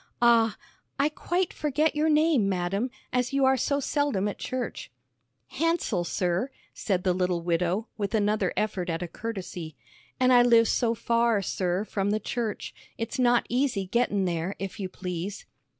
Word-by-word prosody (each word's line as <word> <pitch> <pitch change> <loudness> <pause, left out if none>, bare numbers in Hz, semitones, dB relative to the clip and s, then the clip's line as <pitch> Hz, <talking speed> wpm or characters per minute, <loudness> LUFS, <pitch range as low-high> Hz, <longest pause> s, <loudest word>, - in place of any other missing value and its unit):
"Ah 230 -2 +4 0.4
I 285 - +3
quite 350 +4 -1
forget 300 +1 0
your 305 +1 +2
name, 300 -9 +3
madam, 195 +6 -1 0.2
as 250 +1 0
you 275 -1 +3
are 265 0 +5
so 280 +2 0
seldom 285 -8 0
at 205 - -5
church." 255 -2 -4 0.6
"Hansell, 315 - 0
sir," 180 +8 0 0.2
said 185 -4 -1
the 185 -2 +2
little 180 -2 0
widow, 175 +5 0
with 205 +2 -1
another 210 0 +1
effort 195 -4 -1
at 165 +1 -2
a - - -4
courtesy. 180 -7 -6 0.4
"An' 255 0 +4
I 245 -1 +7
live 230 -2 +5
so 235 -2 +1
far, 230 -2 +2
sir, 185 +2 -1
from 200 -2 -1
the 215 +1 +1
church, 220 0 -3 0.2
it's 230 +3 -4
not 245 -1 +4
easy 245 -6 0
gettin' 205 -1 +1
there, 175 +2 -2
if 195 +2 -6
you 190 -2 -3
please." 185 +2 -5
215 Hz, 165 wpm, -27 LUFS, 185-250 Hz, 0.6 s, I